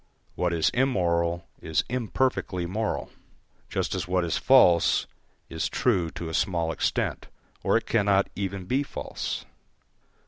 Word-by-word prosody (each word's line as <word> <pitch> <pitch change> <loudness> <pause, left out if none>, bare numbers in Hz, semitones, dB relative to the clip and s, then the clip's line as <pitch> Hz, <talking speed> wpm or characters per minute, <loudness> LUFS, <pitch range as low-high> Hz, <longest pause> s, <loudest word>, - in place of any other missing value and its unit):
What 90 -1 0
is 80 -2 +2
immoral 85 -9 +1 0.2
is 80 -2 0
imperfectly 125 -6 -1
moral, 105 +5 -2 0.6
just - - -1
as 90 -2 -3
what 90 0 +1
is 85 - -1
false 90 -11 +5 0.4
is 80 -1 -2
true 95 -10 +1
to 85 - -5
a 80 - -5
small 85 -3 0
extent, - - -1 0.4
or - - +3
it - - -3
cannot 100 -3 +2
even 95 -2 -3
be 130 +8 +1
false. 145 - -5
90 Hz, 135 wpm, -26 LUFS, 85-110 Hz, 0.6 s, false